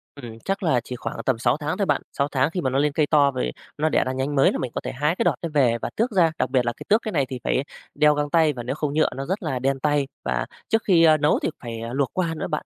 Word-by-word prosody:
Ừm, 120 -5 -10
chắc 195 +1 -2
là 155 -8 +3
chỉ 125 - -6
khoảng 115 -1 -6
tầm 130 -3 +1
6 120 +3 +2
tháng 150 0 -3
thôi 200 - +1
bạn, - - +1 0.2
6 140 - +2
tháng 135 +1 +2
khi 180 - -2
mà 130 - 0
nó 135 +1 0
lên 150 +1 +2
cây 150 +1 +1
to 145 -2 +4
rồi 60 - -2 0.3
nó 155 +2 +1
đẻ - - +2
ra 130 - -2
nhánh 135 +2 -2
mới 135 - +5
là - - -2
mình 125 - -3
có - - -2
thể - - -4
hái 150 +6 0
cái - - 0
đọt - - +2
đó 170 - -3
về 125 -6 +3
và - - -2
tước 235 +3 0
ra, 175 -5 +3
đặc - - +1
biệt 130 -2 +2
là 120 - 0
cái - - -10
tước 215 +3 +4
cái 215 - -4
này 140 -7 +1
thì 130 - -5
phải 130 - +1 0.3
đeo 150 0 +5
găng 145 0 -1
tay 160 -1 +3
và 120 -3 -6
nếu 130 +3 -3
không 150 -2 -2
nhựa 155 +1 +3
nó 135 +1 -4
rất 190 +7 -3
là 135 -6 -2
đen 135 +1 0
tay, 145 0 +1 0.2
và - - -1 0.2
trước 225 0 +2
khi, 175 -4 +4
ơ, 155 -1 +6
nấu 150 0 +2
thì - - +1
phải 115 -2 -6
luộc 135 0 0
qua 175 -3 -1
nữa - - -4
bạn. 150 -3 -3
145 Hz, 325 wpm, -23 LUFS, 130-160 Hz, 0.3 s, ơ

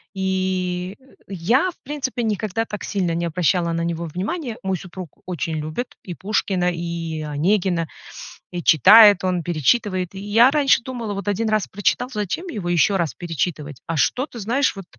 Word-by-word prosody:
и, 185 -1 -1
э, 260 - -24 0.2
я, 210 - +1
в - - -25
принципе, 265 -4 -3
никогда 215 0 -1
так 210 -3 -7
сильно 185 -5 -1
не 170 +1 -1
обращала 170 +1 +1
на 165 0 -1
него 170 0 -2
внимания. 220 - -4
Мой 190 -1 -1
супруг 180 -2 -10
очень 165 -2 -3
любит 155 +12 -5
и 180 - -7
Пушкина, 190 -2 0
и 170 -2 -4
Онегина, 170 +3 0 0.6
и 175 -1 -5
читает 205 - +7
он, 180 -2 0
перечитывает. 180 - 0
И 190 - -7
я 220 +5 +5
раньше 280 -4 +3
думала: 235 -5 -5
"Вот 200 -1 -5
1 215 +2 0
раз 215 -2 +1
прочитал, 205 +5 0
зачем 210 - -3
его 205 - -4
ещё 175 +3 +3
раз 165 -3 -1
перечитывать?" 155 -4 -4
А 165 - -2
что 250 - +1
ты 240 -5 -10
знаешь, 240 +3 +1
вот, 195 - -7
190 Hz, 170 wpm, -22 LUFS, 170-220 Hz, 0.6 s, читает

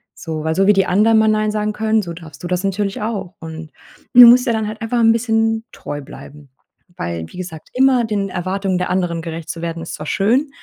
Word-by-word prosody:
So 155 -2 -5
weil 160 - 0
so 195 +1 +2
wie 210 - +6
die 195 -1 +2
anderen 220 +4 +4
mal 220 - +3
nein 215 0 +1
sagen 210 0 -1
können, 220 0 +1
so 175 - -7
darfst 160 -2 -12
du - - -3
das 180 +1 -1
natürlich 195 +1 -2
auch. 200 -5 -4
Und 160 -1 -9 0.4
du 245 -1 +11
musst 250 +2 +6
dir 235 - +3
dann 220 -1 -1
halt 215 +1 -7
einfach 230 +2 -1
'n 225 -1 +5
bisschen 225 -1 0
treu 145 0 -7
bleiben, 145 +1 -13 0.5
weil, 85 -1 -4
wie - - -13
gesagt, 175 -4 -8
immer 260 -1 +3
den 205 -2 -2
Erwartungen 185 +1 -2
der 180 - -2
anderen 175 -3 -1
gerecht 165 -1 -7
zu 165 - -5
werden, 165 -1 -4
ist 165 - -7
zwar 150 - -8
schön, 240 - +1
195 Hz, 230 wpm, -18 LUFS, 165-220 Hz, 0.5 s, du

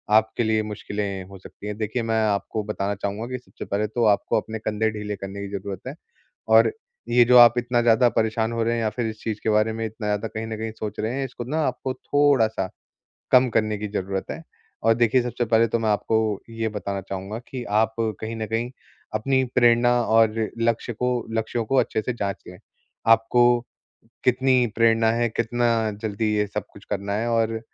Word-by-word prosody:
आपके 110 +2 +2
लिए 110 -1 +1
मुश्किलें 100 -2 -4
हो 100 - -10
सकती 100 - -11
हैं। 105 0 -4
देखिए, 110 +3 -2
मैं 115 0 +1
आपको 105 +1 -1
बताना 100 -1 -2
चाहूँगा 100 +3 -4
कि 125 0 -4
सबसे 125 - -10
पहले 105 +2 -1
तो 120 +3 -1
आपको 105 -2 +2
अपने 110 0 -6
कंधे 110 0 0
ढीले 105 -1 -4
करने 100 +1 -7
की 100 - -5
ज़रूरत 95 -1 -6
है 140 - -5 0.5
और - - +6 0.4
ये 120 0 +6
जो 125 +1 +6
आप 120 0 +8
इतना 120 0 +1
ज़्यादा 120 +1 +4
परेशान 110 0 0
हो 115 -1 -1
रहे 115 +1 +1
हैं 115 - -1
या 110 - +1
फिर 115 +2 -3
इस 110 -1 -6
चीज़ 110 -2 -3
के 110 - +1
बारे 110 +1 +2
में 115 0 -3
इतना 110 0 -5
ज़्यादा 105 +2 -1
कहीं 110 0 -5
न 110 -1 -5
कहीं 110 0 -4
सोच 105 -1 -5
रहे 110 +3 -1
हैं, 135 +1 -2
इसको 130 -2 -7
ना 145 +7 -2
आपको 130 +1 -3
थोड़ा-सा 130 -10 +2 0.6
कम 125 0 +6
करने 110 -1 0
की 105 +1 -4
ज़रूरत 95 -1 -3
है - - -7 0.4
और 115 +1 +5
देखिए, 120 +2 +3
सबसे 120 0 -2
पहले 115 0 +3
तो 115 +1 0
मैं 110 -1 0
आपको 110 0 0
ये 115 0 -2
बताना 100 -2 -4
चाहूँगा 95 +3 -6
कि 130 -2 -6 0.2
आप 110 0 0 0.3
कहीं 110 +1 -4
न 110 -1 -3
कहीं 115 +3 -2 0.4
अपनी 130 +5 +2
प्रेरणा 120 0 +5
और 110 -1 +4 0.3
लक्ष्य 115 +1 0
को 125 +3 -1 0.3
लक्ष्यों 115 +1 -1
को 135 - -1
अच्छे 110 - +1
से 125 - -3
जाँच 100 -4 -4
लें। - - -10 0.6
आपको 115 +2 +3 0.8
कितनी 130 0 +3
प्रेरणा 115 -1 +4
है, 120 0 +1
कितना 115 0 0
जल्दी 110 0 -1
ये 105 - +1
सब 100 - -4
कुछ 100 - -15
करना 100 0 -2
है 110 +3 -1
और 115 -1 +1
110 Hz, 205 wpm, -24 LUFS, 105-120 Hz, 0.8 s, आप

